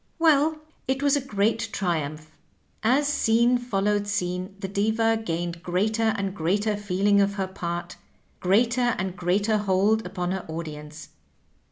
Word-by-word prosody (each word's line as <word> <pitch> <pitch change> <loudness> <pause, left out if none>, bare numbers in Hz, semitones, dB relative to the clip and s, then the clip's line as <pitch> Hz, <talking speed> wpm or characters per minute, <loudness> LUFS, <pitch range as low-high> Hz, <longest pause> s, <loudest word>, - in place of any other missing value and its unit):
"Well, 315 -1 +4 0.3
it 265 +2 -1
was 285 0 +4
a 285 - 0
great 225 -2 0
triumph. 155 -4 -2 0.5
As 265 +6 +3
scene 240 -3 +3
followed 205 -3 0
scene 185 -1 -2
the 195 - -5
Diva 220 +3 +1
gained 170 -2 -3
greater 215 +5 +1
and 195 -1 -2
greater 205 +5 0
feeling 200 0 +2
of 200 0 +1
her 195 -2 -1
part, 175 -2 -5 0.4
greater 240 +6 +2
and 185 0 -3
greater 200 +5 +1
hold 205 +2 +2
upon 180 -1 -3
her 190 -1 -3
audience. 155 -1 -7
200 Hz, 140 wpm, -25 LUFS, 180-225 Hz, 0.5 s, Well